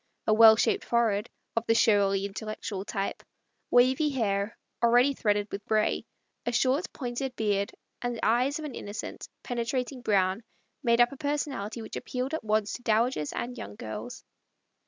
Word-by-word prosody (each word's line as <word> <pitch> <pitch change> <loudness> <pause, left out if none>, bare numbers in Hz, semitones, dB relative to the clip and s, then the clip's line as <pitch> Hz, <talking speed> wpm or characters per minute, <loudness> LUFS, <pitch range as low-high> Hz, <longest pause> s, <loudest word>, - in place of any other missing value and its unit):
A 215 - +4
well 220 0 +9
shaped 220 - +1
forehead 225 -4 +1
— - - -51
of 230 0 -1
the 225 - +4
showy 200 -3 +3
intel 200 +2 -7
lectual 210 -2 -4
type 195 -2 -3 0.3
— - - -48
wavy 260 +5 +4
hair, 210 -5 -1 0.2
already 245 +4 +5
threaded 205 -4 +1
with 200 +1 -5
grey, 215 -1 +1 0.4
a 240 - -1
short, 265 +7 +1
pointed 250 0 -4
beard, 205 -3 0 0.3
and 245 -2 -2
eyes 250 +6 +2
of 310 - -6
an 285 - -6
innocent, 205 -1 -6
penetrating 250 +2 -2
brown, 195 -2 +2 0.4
made 235 -3 +4
up 240 - +4
a 275 - -9
personality 275 -7 -3
which - - -6
appealed 255 +3 -4
at 320 - -2
once 215 -1 +1
to - - -6
dowagers 225 - +1
and 245 +1 -4
young 100 +1 -7
girls. 110 +1 -7
230 Hz, 170 wpm, -28 LUFS, 205-250 Hz, 0.4 s, well